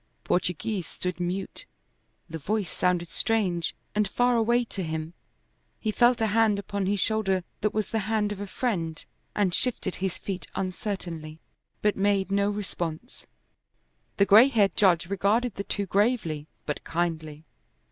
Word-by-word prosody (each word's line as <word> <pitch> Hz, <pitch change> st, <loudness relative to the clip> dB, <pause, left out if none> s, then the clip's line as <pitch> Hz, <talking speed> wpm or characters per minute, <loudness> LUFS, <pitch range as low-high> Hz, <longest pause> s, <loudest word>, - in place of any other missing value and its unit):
Portoghese 180 Hz, +1 st, -1 dB
stood 180 Hz, 0 st, -4 dB
mute; 180 Hz, +2 st, -3 dB, 0.6 s
the 165 Hz, 0 st, -6 dB
voice 200 Hz, +2 st, -1 dB
sounded 180 Hz, -2 st, 0 dB
strange 185 Hz, -7 st, +2 dB, 0.2 s
and 210 Hz, -1 st, +2 dB
far 245 Hz, +4 st, +2 dB
away 235 Hz, +2 st, +3 dB
to 205 Hz, -4 st, -5 dB
him. 160 Hz, -1 st, -3 dB, 0.7 s
He 215 Hz, -, -1 dB
felt 240 Hz, +2 st, +4 dB
a -, -, +4 dB
hand 220 Hz, -1 st, +3 dB
upon 200 Hz, -1 st, -2 dB
his 200 Hz, 0 st, +1 dB
shoulder 195 Hz, -3 st, +1 dB, 0.2 s
that 210 Hz, -, +1 dB
was 215 Hz, -2 st, -2 dB
the 225 Hz, -, +1 dB
hand 215 Hz, -2 st, +1 dB
of 205 Hz, -, -5 dB
a 205 Hz, -, -4 dB
friend, 170 Hz, -9 st, -2 dB, 0.3 s
and 195 Hz, -4 st, +2 dB
shifted 220 Hz, -6 st, -1 dB
his 190 Hz, -1 st, -2 dB
feet 190 Hz, -2 st, -5 dB
uncertainly, 175 Hz, -5 st, -4 dB, 0.4 s
but 210 Hz, -1 st, +3 dB
made 195 Hz, -1 st, +1 dB
no 200 Hz, 0 st, +2 dB
response. 190 Hz, 0 st, -5 dB, 0.9 s
The 200 Hz, -, +5 dB
gray 215 Hz, +6 st, +8 dB
haired 210 Hz, -8 st, +2 dB
judge 180 Hz, -5 st, +4 dB
regarded 200 Hz, +5 st, +1 dB
the 200 Hz, -, -4 dB
two 200 Hz, 0 st, -2 dB
gravely 195 Hz, -7 st, +1 dB, 0.2 s
but 150 Hz, -, -3 dB
kindly. 160 Hz, -2 st, -2 dB
195 Hz, 150 wpm, -27 LUFS, 175-215 Hz, 0.9 s, gray